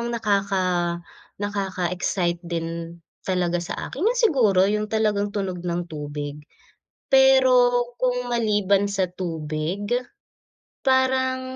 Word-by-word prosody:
ng 235 - -2
nakaka 200 -3 +1 0.7
nakaka-excite 185 -3 -2
din 170 -1 -5 0.2
talaga 175 -2 0
sa 170 - -5 0.2
akin, 275 - -6
yun 460 +6 +2
siguro 250 - +4
yung 210 +1 0
talagang 210 -2 +1
tunog 195 -3 -3
ng 175 0 -2
tubig. 145 -1 -5 0.7
Pero 260 -2 +5 0.2
kung 250 -1 -1
maliban 205 -4 +2
sa 190 -2 0
tubig, 165 +2 -4 1.0
parang 260 0 +2
200 Hz, 105 wpm, -23 LUFS, 175-240 Hz, 1.0 s, Pero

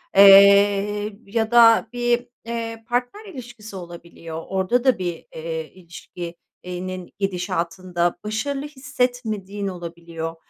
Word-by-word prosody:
eee, 200 +1 +6
ya 220 +2 -1
da 230 -1 +6
bir, 240 0 0 0.2
eee, 230 -1 -5
partner 245 - -2
ilişkisi 240 - -10
olabiliyor. 170 -2 -9
Orada 190 +6 0
da 260 -2 +3
bir, 175 -2 -4
eee, 160 -1 -5
ilişki 175 -1 -9 0.3
eee, 180 0 -5
nin 185 -1 -7
gidişatında 180 -2 -1
başarılı 270 +7 -3
hissetmediğin 245 -8 -3
olabiliyor. 170 -2 -6
200 Hz, 110 wpm, -22 LUFS, 175-235 Hz, 0.3 s, eee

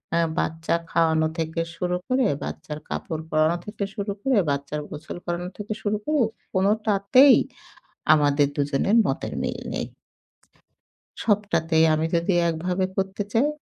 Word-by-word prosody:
আ - - +3 0.2
বাচ্চা 160 +1 -1 0.2
খাওয়ানো 160 -1 +3
থেকে 160 +1 -1
শুরু 180 0 -1
করে, 255 0 +2 0.2
বাচ্চার 150 -1 -6
কাপড় 160 -2 -4
পরানো 155 +2 +2
থেকে 210 -1 -5
শুরু 200 0 -3
করে, 260 -2 +2
বাচ্চার 140 +1 -2
গোছল 150 +3 -7
করানো 175 +1 -3
থেকে 210 +1 -4
শুরু 210 0 0
করে 305 -3 +2 0.3
কোনটাতেই 210 +6 +5 0.8
আমাদের 145 -1 +3
দুজনের 145 +8 +1
মতের - - -2
মিল - - -3
নেই। - - -3 1.4
সবটাতেই 175 -7 +2
আমি 155 +1 +1
যদি 170 +3 +1 0.2
একভাবে 180 +3 -1
করতে 195 +1 -1
চাই 235 +6 +3
175 Hz, 130 wpm, -24 LUFS, 160-210 Hz, 1.4 s, কোনটাতেই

